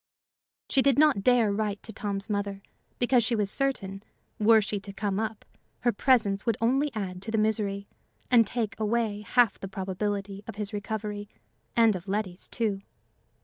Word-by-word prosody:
She 270 - +3
did 275 -1 +3
not 295 -8 +5
dare 235 -1 +4
write 205 -1 -2
to 220 - -8
Tom's 200 -1 -3
mother, 200 -2 -3 0.3
because 245 -1 +3
she 235 +2 +1
was 205 -2 0
certain, 195 -8 -1 0.4
were 220 +1 +6
she 210 -1 -2
to 200 0 -9
come 200 0 -2
up, 220 -1 -4 0.4
her 240 - +3
presence 215 -4 +2
would 230 -2 0
only 270 +6 +2
add 185 -3 -4
to 210 - -5
the 220 - 0
misery, 210 -2 0 0.4
and 230 -4 +6
take 225 -3 -2
away 215 -1 0
half 235 0 +3
the 195 - -5
probability 195 +1 -3
of - - -6
his 210 0 -4
recovery 205 0 -4 0.5
and 225 -3 +5
of 185 +1 -7
Letty's, 195 -2 -3
too. 210 -5 -1
210 Hz, 170 wpm, -28 LUFS, 200-230 Hz, 0.5 s, were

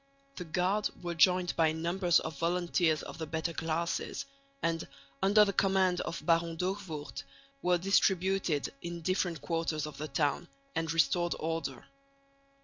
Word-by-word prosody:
The 180 - -5
guard 185 +6 +1
were 175 -1 -2
joined 180 +1 +3
by 160 -2 +3
numbers 170 +2 +2
of 160 -3 -6
volunteers 170 -2 +1
of - - -9
the 160 - -4
better 160 +1 -2
classes 165 +1 -2 0.4
and, 165 -1 0 0.3
under 205 +2 +6
the 200 - -1
command 190 -2 +2
of 170 - -5
Baron 165 -1 +2
D'Hoogvoort, 180 -4 -4 0.4
were 180 0 +3
distributed 190 -3 +1
in 170 0 -5
different 175 -2 -1
quarters 165 -1 -1
of 150 -1 -8
the 155 - -3
town, 145 +4 0 0.3
and 165 -1 -1
restored 165 +2 +2
order. 160 -5 -3
170 Hz, 140 wpm, -31 LUFS, 160-180 Hz, 0.4 s, under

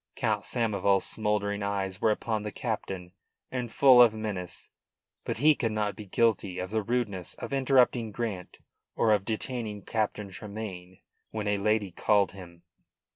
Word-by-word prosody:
Count - - 0
Samoval's 100 -4 +1
smouldering 105 -1 -1
eyes 100 -2 -2
were - - +4
upon 110 0 -1
the 105 0 -5
captain, 95 -7 -4 0.4
and 125 -3 -3
full 130 -2 +7
of 115 -3 +6
menace. 105 -5 -5 0.5
But - - -2
he 150 +6 +6
could 115 -6 -2
not 105 -2 -1
be 105 0 -9
guilty 100 -3 +1
of 90 +1 -4
the 110 0 +1
rudeness 105 -5 -2
of - - -6
interrupting 130 -4 +3
Grant 105 -5 -4 0.4
or 110 - +3
of 100 -2 +1
detaining 110 -2 -3
Captain 105 -1 -2
Tremayne 95 -3 -8 0.3
when 105 -1 -4
a 105 -1 +1
lady 105 -1 +1
called 100 +2 +2
him. 85 -3 -12
105 Hz, 155 wpm, -28 LUFS, 100-115 Hz, 0.5 s, full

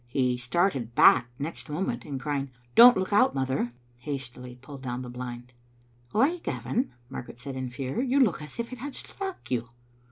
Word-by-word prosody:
He 125 0 +1
started 125 - 0
back 125 - +7
next 150 +3 -6
moment, 150 -7 -2
and 140 -3 -4
crying, 140 -1 -2
*' 120 0 -33
Don't 240 -1 +10
look 190 +2 -1
out, 230 +6 +5
mother," 130 -2 0 0.3
hastily 125 -2 -6
pulled 135 +1 -10
down 125 -1 -4
the 125 - -7
blind. 125 0 -7 0.6
"Why, 275 - +3
Gavin," 125 - -2 0.2
Margaret 125 -2 -8
said 130 +2 -7
in 130 -1 -3
fear, 130 - -3
"you 265 +1 +2
look 215 - +3
as 150 -2 -9
if 235 +2 -4
it 250 - -8
had 285 +3 -6
struck 385 - -7
you." 120 -2 -1
135 Hz, 185 wpm, -28 LUFS, 125-190 Hz, 0.6 s, Don't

